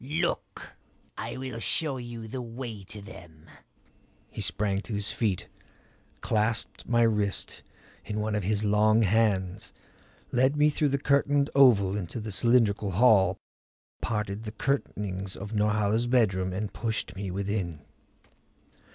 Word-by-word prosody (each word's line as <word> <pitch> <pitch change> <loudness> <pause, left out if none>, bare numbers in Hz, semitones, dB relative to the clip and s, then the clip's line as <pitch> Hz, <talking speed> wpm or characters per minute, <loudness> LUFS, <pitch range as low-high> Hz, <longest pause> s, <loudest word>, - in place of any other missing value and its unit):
Look 165 +6 -3 0.4
I - - -5
will 130 -3 -5
show 140 +4 0
you 120 -2 -7
the 125 +3 -5
way 115 -3 -7
to 105 +2 -9
them." 80 -5 -13 0.9
He - - -5
sprang 100 -1 0
to 110 - -5
his 100 0 -2
feet, 105 -6 -1 0.7
clasped 110 +1 -1
my 120 -1 +4
wrist 105 -3 0 0.4
in 105 0 -4
one 105 0 -1
of 105 - 0
his 105 +2 0
long 110 +2 +4
hands, 100 -3 +1 0.6
led 130 +4 +3
me 150 +1 +4
through 150 0 +1
the 140 - +1
curtained 140 0 +2
oval 110 -8 +5
into 100 +2 -4
the 110 -1 -5
cylindrical 105 -2 +2
hall, 100 -3 +5 0.6
parted 105 -2 -2
the 105 - -5
curtainings 100 -6 -2
of 100 +2 -7
Norhala's 105 +2 +1
bedroom 95 -7 +2
and 100 +3 -4
pushed 115 -2 -3
me 100 0 -4
within. 95 -4 -3
105 Hz, 135 wpm, -28 LUFS, 100-120 Hz, 0.9 s, oval